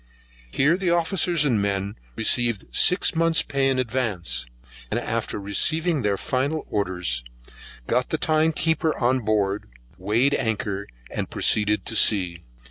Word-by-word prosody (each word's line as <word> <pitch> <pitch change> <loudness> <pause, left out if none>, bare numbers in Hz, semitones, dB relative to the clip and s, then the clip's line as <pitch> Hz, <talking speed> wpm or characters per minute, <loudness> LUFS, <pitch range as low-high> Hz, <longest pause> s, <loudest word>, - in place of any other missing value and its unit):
Here 145 - +2
the 185 -2 -1
officers 170 -1 +2
and 120 -7 +1
men 100 0 -2 0.2
received 115 -1 0
six 180 +2 +4
months 165 -1 +3
pay 140 -1 0
in 135 - 0
advance, 110 - -1 0.4
and - - -1
after - - -3
receiving 155 - +1
their 100 -3 0
final 140 +8 -2
orders, 90 - -1 0.6
got 125 - 0
the 160 - 0
time 155 +1 +2
keeper 160 0 0
on 130 +1 +1
board, 105 -3 -1 0.3
weighed 115 +9 +1
anchor, 105 -4 -2 0.2
and - - -4
proceeded 105 0 +1
to 115 - -3
sea. 90 -6 +2
120 Hz, 135 wpm, -23 LUFS, 100-155 Hz, 0.6 s, six